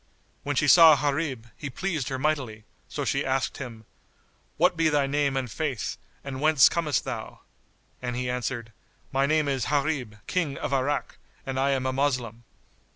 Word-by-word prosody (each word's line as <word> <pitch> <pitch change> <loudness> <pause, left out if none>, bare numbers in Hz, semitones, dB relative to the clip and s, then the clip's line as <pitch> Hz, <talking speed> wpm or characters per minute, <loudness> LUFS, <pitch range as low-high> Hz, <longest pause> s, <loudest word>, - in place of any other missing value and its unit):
When 145 0 -2
she 145 - +2
saw 160 0 +9
Gharib, 140 -4 -1
he 145 - -6
pleased 155 -1 -2
her 130 - -2
mightily; 130 -7 -1 0.3
so - - -3
she - - 0
asked 130 0 -1
him, 115 -5 -8 0.7
"What 180 +2 +3
be 165 -1 +3
thy 145 -2 +2
name 140 -1 0
and 135 - 0
Faith 140 -3 -3 0.3
and 135 -1 -6
whence 155 -3 +6
comest 155 -7 0
thou?" - - -6 0.6
and 125 -1 -3
he 125 0 -2
answered, 125 -2 -3 0.4
"My 135 +1 +2
name 155 0 +2
is 135 -4 0
Gharib 140 -7 -1
King 160 -7 -1
of - - -3
Irak, 135 +2 -1 0.3
and 135 -1 -3
I 135 +1 +2
am 135 -2 0
a 130 - 0
Moslem." 125 -4 -1
135 Hz, 170 wpm, -26 LUFS, 130-150 Hz, 0.7 s, saw